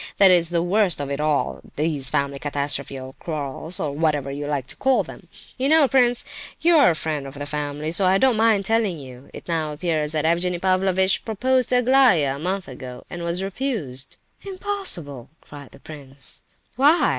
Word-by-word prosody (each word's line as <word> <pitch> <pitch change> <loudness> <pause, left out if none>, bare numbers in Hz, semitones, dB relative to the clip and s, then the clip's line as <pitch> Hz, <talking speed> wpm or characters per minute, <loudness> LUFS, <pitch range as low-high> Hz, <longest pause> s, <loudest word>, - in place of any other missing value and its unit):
That's 180 -4 +5
the 170 -1 0
worst 190 -1 +2
of 140 -1 -4
it 140 - -3
all, 150 -1 0
these 145 -3 0
family 140 0 -1
catastrophes 140 -1 -2
or 130 0 -9
quarrels, 155 +1 -3
or 150 - -2
whatever 145 -2 -1
you 145 +1 -5
like 145 -3 -2
to - - -7
call 265 -1 +2
them. - - -12 0.3
You 270 +2 +1
know, 315 -2 +5
prince, 245 -2 +2 0.3
you 340 +1 +4
are 285 - +6
a 165 - +1
friend 155 -3 -3
of 135 - -10
the 145 0 -5
family, 150 +1 -4
so 180 +3 +3
I 185 +1 +4
don't 255 +3 +3
mind 220 -3 +2
telling 220 -5 +1
you; 130 -2 -12
it - - -11
now 160 -3 -1
appears 155 -1 -1
that 155 -1 0
Evgenie 175 +2 +1
Pavlovitch 190 +1 +2
proposed 250 +3 0
to 250 - +2
Aglaya 245 - +4
a - - -10
month 185 +3 -3
ago, 125 -1 -9
and 175 - -6
was 170 +2 0
refused." 195 - -3 0.2
"Impossible!" 370 - -2
cried 145 -2 -12
the - - -17
prince. 140 -3 -6 0.4
"Why? 295 +3 +4
165 Hz, 190 wpm, -22 LUFS, 145-215 Hz, 0.4 s, are